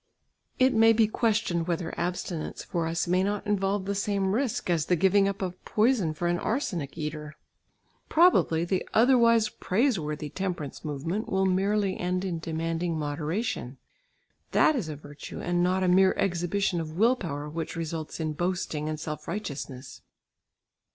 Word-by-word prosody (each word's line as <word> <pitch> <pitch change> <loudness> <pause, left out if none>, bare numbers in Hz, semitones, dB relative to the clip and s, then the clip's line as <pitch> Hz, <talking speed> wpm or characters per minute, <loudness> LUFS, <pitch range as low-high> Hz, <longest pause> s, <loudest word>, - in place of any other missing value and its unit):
It 260 0 +4
may 225 0 +6
be 220 -1 +4
questioned 215 -7 0
whether 170 -1 -2
abstinence 175 -2 -3
for 170 -2 -2
us 165 +1 -1
may 180 +1 +3
not 205 +2 -1
involve 200 -1 0
the 200 - -1
same 200 -1 0
risk, 250 0 -1
as 170 -4 +1
the 180 - +3
giving 195 +3 +4
up 195 0 -3
of 180 -1 -5
poison 215 -8 +2
for 175 - -1
an 175 0 +1
arsenic 180 - -2
eater. 150 0 -5 0.7
Probably 310 - +4
the 185 +1 0
otherwise 230 -2 +5
praiseworthy 170 - -1
temperance 175 -7 -4
movement 165 - -3
will 190 -1 +1
merely 195 +1 +1
end 180 +1 -1
in 175 -3 -2
demanding 165 +1 -2
moderation; 150 - -3 0.8
that 310 - +5
is 205 - -2
a 155 - -4
virtue 145 0 -9
and 175 0 0
not 185 +1 +2
a - - +2
mere 185 +1 +5
exhibition 175 0 0
of 155 0 -7
will 230 +5 +4
power 150 - -5
which 160 +1 -5
results 165 -1 -4
in 155 -1 -1
boasting 165 -2 -2
and 155 -1 -3
self 155 -1 -6
righteousness. 145 -8 -6
180 Hz, 160 wpm, -27 LUFS, 160-205 Hz, 0.8 s, may